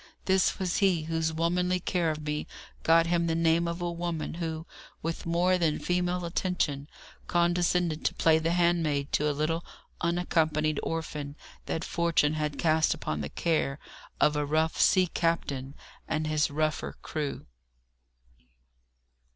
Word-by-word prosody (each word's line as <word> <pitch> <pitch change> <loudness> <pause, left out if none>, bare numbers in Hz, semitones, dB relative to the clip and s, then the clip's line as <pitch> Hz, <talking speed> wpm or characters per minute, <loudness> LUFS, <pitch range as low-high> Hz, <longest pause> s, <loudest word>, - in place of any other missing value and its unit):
This 190 0 +3
was 185 -3 -1
he 185 -6 +3
whose 160 0 -1
womanly 180 +3 +1
care 175 -2 0
of 155 -1 -3
me 150 0 -2 0.3
got 165 0 +5
him 170 0 +1
the 165 - +1
name 165 +1 +2
of 170 +1 -3
a 175 - -1
woman, 170 -2 -3
who, 165 -1 -4 0.4
with 165 +1 -3
more 180 +2 +2
than 160 -3 +1
female 180 0 -1
attention, 165 -5 -1 0.4
condescended 175 -1 +1
to - - +1
play 160 -1 +4
the 165 +1 0
handmaid 165 -5 +1
to 150 +1 +2
a - - +2
little 155 +3 -1 0.4
unaccompanied 160 -3 +1
orphan 150 -3 -4 0.3
that 165 - -2
fortune 170 -3 +1
had 150 -2 -2
cast 160 -1 +2
upon 75 -1 -3
the 70 - -4
care 155 - 0 0.4
of 150 - +4
a 150 - +1
rough 155 +2 +1
sea 185 -1 +5
captain 145 -6 -1 0.3
and 155 0 -1
his 155 0 +1
rougher 155 +1 -1
crew. 150 -3 -4
165 Hz, 145 wpm, -28 LUFS, 155-175 Hz, 0.4 s, got